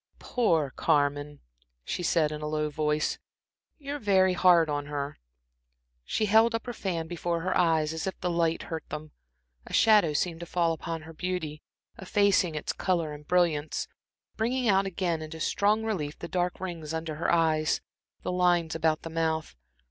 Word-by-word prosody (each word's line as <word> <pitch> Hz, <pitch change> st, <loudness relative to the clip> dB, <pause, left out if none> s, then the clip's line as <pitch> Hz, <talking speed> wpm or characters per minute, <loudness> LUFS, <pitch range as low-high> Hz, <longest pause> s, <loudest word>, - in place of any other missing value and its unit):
"Poor 165 Hz, -, +1 dB
Carmen!" 145 Hz, -1 st, 0 dB, 0.4 s
she -, -, -3 dB
said, 165 Hz, -3 st, +2 dB
in 150 Hz, 0 st, -5 dB
a 150 Hz, -, -3 dB
low 150 Hz, 0 st, -1 dB
voice. 150 Hz, 0 st, 0 dB, 0.6 s
"You're 290 Hz, 0 st, -5 dB
very 190 Hz, -4 st, +3 dB
hard 175 Hz, -3 st, +5 dB
on 145 Hz, -1 st, -2 dB
her." 145 Hz, -1 st, -4 dB, 0.9 s
She 215 Hz, -, 0 dB
held 220 Hz, +3 st, +4 dB
up 230 Hz, -, -3 dB
her 245 Hz, -, -4 dB
fan 175 Hz, -7 st, -3 dB
before 170 Hz, 0 st, -2 dB
her 185 Hz, +2 st, -1 dB
eyes, 160 Hz, -3 st, +2 dB
as 160 Hz, +3 st, -3 dB
if 190 Hz, -, -4 dB
the 180 Hz, -, -1 dB
light 165 Hz, -1 st, +1 dB
hurt 160 Hz, -1 st, -5 dB
them. 155 Hz, 0 st, -6 dB, 0.6 s
A -, -, -10 dB
shadow 210 Hz, -8 st, +5 dB
seemed 165 Hz, +2 st, -1 dB
to 170 Hz, -, -7 dB
fall 170 Hz, -2 st, +1 dB
upon 165 Hz, 0 st, -5 dB
her 165 Hz, +1 st, -11 dB
beauty, 160 Hz, -3 st, -4 dB, 0.4 s
effacing 190 Hz, -3 st, +2 dB
its 155 Hz, -, -2 dB
color 170 Hz, -5 st, -1 dB
and 150 Hz, 0 st, -11 dB
brilliance, 165 Hz, -4 st, +1 dB, 0.5 s
bringing 245 Hz, +3 st, 0 dB
out 195 Hz, -1 st, +3 dB
again 175 Hz, -3 st, -1 dB
into 155 Hz, +1 st, -7 dB
strong 210 Hz, +6 st, +2 dB
relief 160 Hz, -10 st, -3 dB
the 170 Hz, -, -7 dB
dark 180 Hz, 0 st, -1 dB
rings 165 Hz, -4 st, -5 dB
under 160 Hz, -1 st, -4 dB
the -, -, +1 dB
eyes, 160 Hz, -2 st, +2 dB, 0.4 s
the -, -, -2 dB
lines 175 Hz, -2 st, +2 dB
about 160 Hz, -1 st, +1 dB
the 165 Hz, -, -6 dB
mouth. 160 Hz, -, -1 dB
165 Hz, 170 wpm, -28 LUFS, 155-185 Hz, 0.9 s, hard